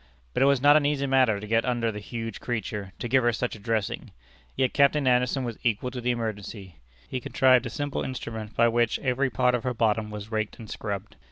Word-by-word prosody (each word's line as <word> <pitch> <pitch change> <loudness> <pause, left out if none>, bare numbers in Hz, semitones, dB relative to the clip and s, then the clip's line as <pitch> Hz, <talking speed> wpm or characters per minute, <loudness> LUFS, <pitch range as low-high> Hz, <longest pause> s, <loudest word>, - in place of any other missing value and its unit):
But - - 0
it 135 - +6
was 140 -2 +3
not 145 +1 +7
an 155 - +5
easy 140 -1 +1
matter 130 -6 +3
to 105 - -7
get 115 +2 +2
under 120 -2 0
the 105 - -6
huge 115 0 -6
creature, 105 -5 -4
to 120 - -4
give 130 +2 +3
her 120 - +4
such 120 +1 -2
a - - -11
dressing. 110 -1 -2 0.5
Yet 130 -1 +1
Captain 140 0 +3
Anderson 125 +1 +2
was 120 -3 -5
equal 120 +2 0
to 125 -1 -5
the 125 - -1
emergency. 105 -6 -4 0.3
He 130 - -3
contrived 130 0 +3
a - - -5
simple 145 +4 -3
instrument 110 -4 -5
by 115 - +5
which 120 -1 +2
every 130 +1 0
part 125 -1 +2
of 120 - 0
her 125 -1 -2
bottom 110 -1 +1
was 105 +1 -8
raked 110 -1 -2
and 110 - -10
scrubbed. 100 -2 -5
120 Hz, 230 wpm, -26 LUFS, 110-130 Hz, 0.5 s, not